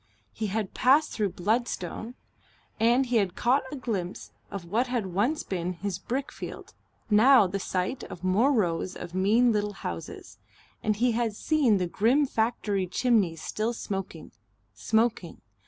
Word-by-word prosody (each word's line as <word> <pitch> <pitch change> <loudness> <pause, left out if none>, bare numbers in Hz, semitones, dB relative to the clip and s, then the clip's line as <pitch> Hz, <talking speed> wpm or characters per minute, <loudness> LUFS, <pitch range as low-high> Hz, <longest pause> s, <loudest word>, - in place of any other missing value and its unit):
He 220 - -3
had 205 0 -3
passed 285 +5 +4
through 205 -4 -1
Bludston 220 +2 -2 0.6
and 240 +4 +4
he 240 -1 +1
had 195 -4 0
caught 255 +4 +2
a - - -4
glimpse 205 -9 -4 0.2
of 195 -3 -6
what 225 +9 0
had 225 -8 -2
once 240 - +1
been 180 -1 -3
his 190 +1 -4
brickfield, 265 +7 -5 0.4
now 225 +2 +7
the 195 +2 -3
site 185 +7 -2
of 175 - -10
more 205 +9 +3
rows 185 -6 0
of 170 - -8
mean 215 +6 +3
little 210 -1 -1
houses, 85 - -7 0.4
and 215 -1 +1
he 240 +3 +2
had 225 -2 -1
seen 270 -6 +2
the 180 - 0
grim 235 - +2
factory 220 -6 -1
chimneys 190 -6 +1
still 220 +3 -2
smoking, 195 -4 -6 0.4
smoking.... 220 -6 0
215 Hz, 150 wpm, -27 LUFS, 185-245 Hz, 0.6 s, now